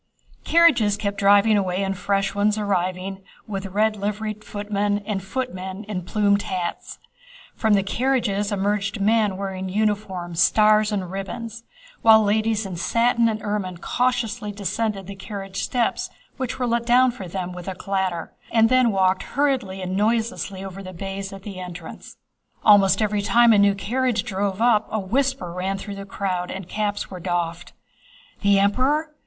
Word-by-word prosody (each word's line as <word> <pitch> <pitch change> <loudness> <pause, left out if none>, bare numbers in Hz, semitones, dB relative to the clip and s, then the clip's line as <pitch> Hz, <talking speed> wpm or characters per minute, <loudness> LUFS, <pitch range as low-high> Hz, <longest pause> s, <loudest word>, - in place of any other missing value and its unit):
Carriages 270 -12 +4
kept 200 -1 -3
driving 205 +2 +5
away 190 0 -1
and 195 0 -1
fresh 195 0 0
ones 205 +1 +1
arriving, 190 -1 -2 0.2
with 195 -2 -4
red 215 +3 +1
liveried 210 +1 -4
footmen 205 0 -1
and 205 -3 -2
footmen 190 -3 -4
in 200 -3 -4
plumed 200 +2 +1
hats. 180 -3 -4 0.6
From 220 -2 +2
the 195 - +2
carriages 215 -3 0
emerged 200 +1 -1
men 210 -1 +2
wearing 190 -1 -4
uniforms, 190 -4 -2
stars, 215 0 +4
and 190 -4 -3
ribbons, 225 +4 -6 0.4
while 220 -1 +7
ladies 215 +1 +1
in 185 -3 -5
satin 230 +5 +2
and 215 -1 -4
ermine 200 -4 -2
cautiously 230 0 -1
descended 205 0 -2
the 200 - -7
carriage 195 -1 -6
steps 245 -2 -1 0.3
which 260 -2 -3
were 250 - -1
let 235 0 0
down 250 +1 +5
for 200 -6 -8
them 180 0 -4
with 180 0 -9
a 190 - -3
clatter, 190 -3 -2 0.2
and 225 -1 +4
then 255 -1 +4
walked 190 -1 +2 0.2
hurriedly 255 -10 0
and 185 0 -3
noiselessly 215 -2 -1
over 195 0 -7
the 185 -1 -9
baize 195 +2 -5
at 195 -1 -10
the 195 -3 -7
entrance. 180 -1 -9 0.5
Almost 205 0 +6
every 210 -1 0
time 235 +3 +5
a 205 - +5
new 200 0 +4
carriage 240 +2 0
drove 200 -1 -2
up 220 -3 +3
a 220 - 0
whisper 235 -2 -1
ran 190 +2 -2
through 200 +1 -7
the 195 0 -7
crowd 185 -3 -2
and 190 -2 -6
caps 205 0 -2
were 185 - -7
doffed. 175 -1 -3 0.7
"The 200 -1 +4
Emperor?... 265 +10 +1
205 Hz, 160 wpm, -23 LUFS, 190-220 Hz, 0.7 s, while